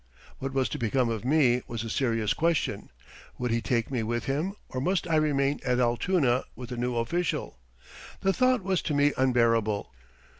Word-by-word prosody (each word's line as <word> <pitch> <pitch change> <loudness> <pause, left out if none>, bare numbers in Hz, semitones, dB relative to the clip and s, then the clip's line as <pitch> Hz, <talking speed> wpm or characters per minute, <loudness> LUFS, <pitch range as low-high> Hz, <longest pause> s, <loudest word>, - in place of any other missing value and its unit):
What 135 +1 -3
was 135 -1 +1
to - - -4
become 120 +1 +1
of 115 -2 -3
me 130 -3 +3
was 115 -2 -4
a - - -5
serious 115 -5 +1
question. 165 -1 0 0.5
Would 125 -1 -2
he 115 0 +1
take 115 +1 -1
me 125 -3 0
with 120 +2 -2
him 155 +8 -1
or 130 - -4
must 180 +4 0
I 165 - +1
remain 145 -2 +1
at 125 -1 +1
Altoona 125 +2 +2
with 125 -2 -8
the 125 - -4
new 120 0 -1
official? 155 - -2 0.6
The 195 - +2
thought 255 -2 +2
was 190 -2 0
to 150 - -2
me 145 0 +3
unbearable. 115 - +1
130 Hz, 185 wpm, -27 LUFS, 120-155 Hz, 0.6 s, me